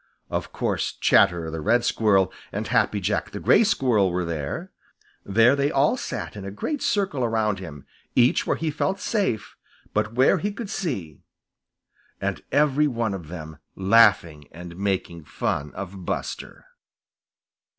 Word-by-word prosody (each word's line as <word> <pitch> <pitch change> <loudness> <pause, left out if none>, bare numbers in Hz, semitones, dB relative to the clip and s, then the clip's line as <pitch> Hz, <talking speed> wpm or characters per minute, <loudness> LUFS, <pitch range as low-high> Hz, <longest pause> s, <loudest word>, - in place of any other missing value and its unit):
Of - - -3
course, - - -2
Chatterer 85 -2 +3
the 80 0 -5
Red 120 +9 +2
Squirrel 100 -4 +2 0.2
and - - -3
Happy 105 - +1
Jack 100 +2 -1
the 100 - -7
Gray 220 - +5
Squirrel 125 - +2
were 90 0 -1
there. 80 -4 -4 0.5
There 115 +6 +4
they 140 0 +1
all 145 - +2
sat 255 - -5
in 100 - -7
a 100 - -5
great 275 - -4
circle 190 -11 0
around 110 -4 0
him, 75 -7 -9 0.3
each 125 0 +3
where - - +1
he 160 -1 -2
felt 190 +6 -1
safe, 195 - -1 0.4
but 105 - 0
where 130 +2 +4
he 205 - -2
could 205 0 -7
see, 100 - -4 1.0
and - - -3
every 150 +1 +3
one 115 -6 -1
of 90 -5 -7
them 80 -2 -8 0.2
laughing 95 -7 +4
and 85 +1 -10
making 95 -4 -2
fun 75 0 -2
of 95 -1 -7
Buster. - - -5
105 Hz, 150 wpm, -24 LUFS, 90-135 Hz, 1.0 s, Gray